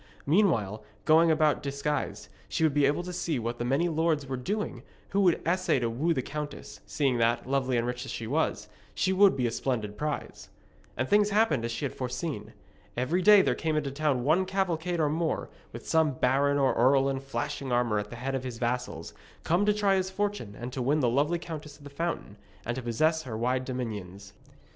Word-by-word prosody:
Meanwhile, 120 - +2 0.2
going 165 +2 +5
about 155 -2 +3
disguised, 140 +1 -3 0.2
she - - -1
would 155 -3 +3
be 145 -1 +4
able 150 +5 0
to 180 0 -6
see 165 -4 -1
what 120 0 -3
the - - -1
many 135 +8 +1
lords 160 -3 +1
were 135 -1 -3
doing 160 - -3 0.3
who 200 - +1
would 180 -4 +4
essay 185 -3 +2
to 120 -2 -1
woo 150 +9 0
the 130 -6 0
countess, 150 +1 -6
seeing 135 -5 0
that, 115 +1 +1
lovely 130 -2 +1
and 115 - 0
rich 125 0 -3
as 135 - -8
she 115 - -5
was, 120 -4 -1 0.3
she 190 - +1
would 195 -5 +5
be 125 - +1
a 120 - 0
splendid 110 -4 -3
prize. 150 -1 -4 0.5
And 130 - 0
things 205 +3 +4
happened 200 - +2
as 115 - -3
she 115 +5 -3
had 140 - -3
foreseen. 130 +5 -4 0.4
Every 145 +9 +1
day 205 0 +7
there - - +2
came 160 -2 -1
into 140 -2 -1
the - - -12
town 145 -4 +1
one 165 +7 +3
cavalcade 180 -3 -1
or 155 - +3
more, 160 +2 -1 0.2
with - - -9
some 160 -3 +3
baron 135 +3 +2
or 135 -2 +3
earl 135 +3 +4
in 135 -1 -1
flashing 135 0 -4
armour 120 -3 +2
at 105 0 -5
the - - -8
head 130 +3 -4
of 135 -1 -2
his 125 -3 -5
vassals, 120 -8 -3 0.3
come 180 +5 +2
to - - +6
try 205 -1 +2
his 190 -1 +1
fortune 200 - -3
and 120 +1 -6
to 130 - -3
win 145 +5 +2
the 125 - +3
lovely 145 +7 +1
Countess 155 -3 -8
of 145 - -18
the 145 - -10
Fountain, 155 -9 -4 0.3
and 120 - -1
to 130 - -4
possess 155 +7 +1
her 120 -7 -6
wide 125 +3 0
dominions. 105 -6 -6
140 Hz, 215 wpm, -28 LUFS, 125-165 Hz, 0.5 s, day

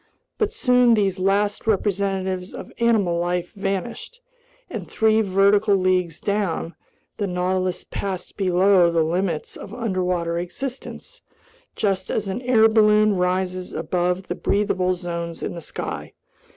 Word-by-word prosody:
But 430 -2 +1
soon 250 - +4
these 195 -3 0
last 200 +3 +1
representatives 195 -3 -1
of - - -8
animal 210 -8 +2
life 175 0 -2
vanished, 200 - -4 0.5
and - - -6
three 220 0 +3
vertical 200 +1 +3
leagues 185 -3 +1
down, 200 -5 -1 0.4
the 205 - -1
Nautilus 180 0 -1
passed 190 -2 -5
below 185 -1 +4
the 165 -1 +2
limits 170 0 -2
of 205 - -9
underwater 180 -6 -1
existence 270 - -7 0.5
just 195 -3 -1
as 210 - -1
an 195 +5 -3
air 240 -3 +5
balloon 215 -1 +4
rises 180 0 -1
above 180 +3 -1
the - - -3
breathable 185 -3 0
zones 170 -2 -5
in - - -3
the 170 - -7
sky. - - -6
190 Hz, 130 wpm, -23 LUFS, 180-210 Hz, 0.5 s, air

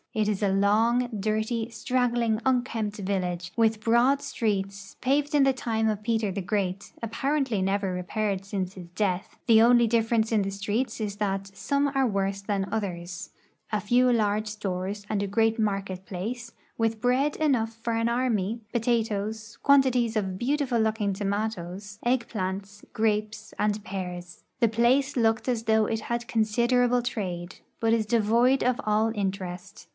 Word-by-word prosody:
It 215 -1 +1
is 210 -1 -1
a 200 - +3
long, 220 +5 +3
dirty, 220 +3 -1
.straggling, 240 -3 0
unkempt 235 -5 0
village, 180 -3 -2
with 225 -2 +2
broad 240 +5 +3
streets, 200 -2 -3
paved 285 +3 +1
in 290 -2 +5
the 270 0 +4
time 225 -3 -1
of 215 -1 -1
Peter 220 -3 0
tlie 190 -1 -4
Great, 195 -1 -2
apparently 260 -1 0
never 195 0 0
repaired 195 +2 -2
since 195 -2 -3
his 180 -3 -10
death; 190 -3 -1
the 225 -2 +6
onl 240 +2 +6
v 235 -1 +4
difference 225 0 +1
in 215 - +3
the 195 - -1
streets 210 +5 -2
is 210 -2 -3
that 195 -1 -2
some 280 +5 0
are 270 -1 +3
worse 195 -2 -1
than 195 -1 -1
others; 180 -4 -4 0.4
a 215 - +1
few 245 +4 +3
large 215 -2 +1
stores 205 -1 -4
and 205 -2 -1
a - - -2
great 225 +3 +2
market 195 -3 -2
place, 230 +6 -5 0.3
with 225 -1 0
bread 255 +5 +1
enough 255 -8 +1
for 230 +1 -3
an 230 +1 +1
army; 235 -3 0
potatoes, 220 -2 -1
quantities 255 -5 +4
of 190 -3 -2
beautiful 265 0 0
looking 220 -2 +1
tomatoes, 200 -1 -3
egg 240 0 +1
plants, 195 0 -4
gra})es, 215 -1 -1
and 210 0 0
pears. 180 -2 -6 0.2
The 235 - +4
place 245 +6 +2
looked 225 -1 +1
as 240 -3 0
though 220 -1 +3
it 225 +1 -2
had 235 0 -2
considerable 240 +2 +2
trade, 185 -7 -4 0.2
l>ut 225 0 +3
is 225 -2 +2
devoid 235 +4 +3
of 250 0 +1
all 215 +1 +2
interest. 190 -1 -4
220 Hz, 160 wpm, -27 LUFS, 200-235 Hz, 0.4 s, the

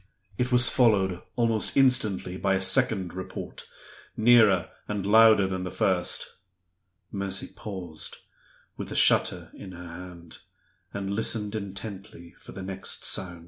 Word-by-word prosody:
It 125 +4 -2
was 125 0 +5
followed 95 -7 +2
almost 115 -1 0
instantly 120 -9 +2
by 95 +1 0
a - - 0
second 95 -2 +2
report, 95 0 -8 0.5
nearer 110 -6 +4 0.2
and 105 -2 -3
louder 110 -1 +6
than 95 -1 -3
the 90 - -4
first. 95 0 0 0.9
Mercy 100 -1 -2
paused, 90 -7 -6 0.6
with - - -6
the - - -6
shutter - - +2
in 95 -2 -11
her 90 0 -10
hand, 85 -1 -11 0.5
and 100 -1 -5
listened 105 -1 0
intently 100 -4 -8
for - - -13
the 95 - -8
next 95 0 -5
sound. 85 -2 -3
95 Hz, 135 wpm, -26 LUFS, 95-110 Hz, 0.9 s, louder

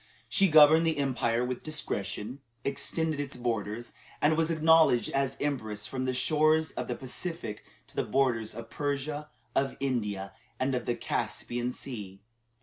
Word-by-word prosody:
She 195 +11 +4
"governed 155 0 +7
the 160 - +1
empire 125 -4 +1
with 125 0 -3
discretion," 120 -5 -3 0.3
extended 150 +2 -1
its 145 -1 -4
borders, 115 -1 -3 0.3
and 155 +2 +4
was 165 0 +2
acknowledged 160 -5 +5
as 135 -1 0
empress 110 -8 -2
from 130 +2 -3
the 130 - 0
shores 155 +3 +3
of - - -4
the 125 - -2
Pacific 130 -3 -6 0.2
to - - -19
the - - +1
borders 120 -6 +1
of 115 0 -8
Persia, 145 +1 -2 0.3
of 135 0 +1
India, 105 -8 -2 0.3
and 130 +1 +1
of 125 -1 -2
the 120 - +1
Caspian 120 +1 -2
Sea. 105 -8 -7
135 Hz, 150 wpm, -29 LUFS, 120-150 Hz, 0.3 s, governed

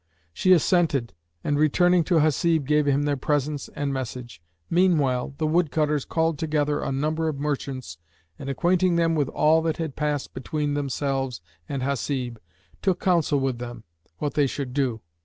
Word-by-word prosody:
She 185 - +2
assented 165 -8 +3 0.3
and 145 0 0
returning 175 +3 +4
to 175 - +1
Hasib 160 0 +2
gave 150 +1 +2
him 140 +1 +2
their 145 -1 +1
presents 145 +1 -1
and 140 -1 -2
message. 125 -5 -6 0.3
Meanwhile, 145 -8 +2
the 160 - -1
woodcutters 155 -3 +1
called 160 -2 0
together 150 -2 0
a - - -2
number 155 +4 -1
of 155 -3 -2
merchants 135 - -4 0.4
and, 135 - -6
acquainting 175 +5 +2
them 165 -1 +2
with 145 -4 +1
all 160 +2 +3
that 160 -1 -1
had 160 -4 -4
passed 150 -2 -2
between 150 +2 -2
themselves 135 -2 -2 0.3
and 135 -2 -2
Hasib, 130 -3 -2 0.4
took 190 -3 +1
counsel 170 -6 +2
with 135 -3 -1
them 120 -2 -7 0.3
what 145 +5 -2
they 145 -2 +3
should 130 -1 -4
do. 130 -5 0
145 Hz, 160 wpm, -25 LUFS, 135-160 Hz, 0.4 s, returning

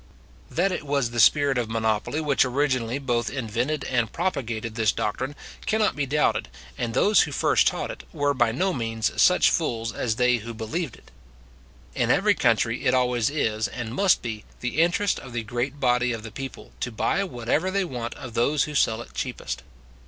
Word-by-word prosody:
That 190 +4 +1
it 180 - -3
was 140 -4 0
the 120 - -3
spirit 140 +1 +5
of 115 -2 -2
monopoly 110 +5 0
which 145 -3 +3
originally 130 -2 0
both 120 -4 -1
invented 130 +3 -2
and 120 -3 0
propagated 120 -11 -2
this 110 -2 +2
doctrine, 130 +8 -3 0.3
cannot 220 -1 +2
be 145 -2 -1
doubted 150 +3 +1 0.3
and 120 -1 -3
they - - +3 0.2
who - - -5
first - - +3
taught - - -1
it, - - -9
were 145 -3 +1
by 120 -4 +2
no 185 +10 0
means 115 - -1
such - - +5
fools 115 0 -1
as 115 -2 -1
they 125 +1 +3
who 115 +1 -7
believed 125 +6 -3
it. - - -20 0.8
In - - 0
every - - +4
country 115 +4 +1
it 125 - +4
always 125 -3 +2
is, 110 -7 0
and 120 -2 -6
must 190 +6 +3
be, 110 -3 -5 0.2
the 125 +5 0
interest 175 +4 +2
of 125 -3 -11
the 120 -1 -2
great 120 +5 -3
body 125 -1 +2
of 115 -1 -6
the 115 - -8
people, 135 +3 -8
to 125 - -3
buy 195 - 0
whatever 140 +2 -1
they 195 0 0
want 120 -7 -5
of 125 -3 -9
those 140 +6 +2
who 150 - -5
sell 115 -5 +2
it - - -18
cheapest. - - -4
125 Hz, 190 wpm, -25 LUFS, 115-145 Hz, 0.8 s, spirit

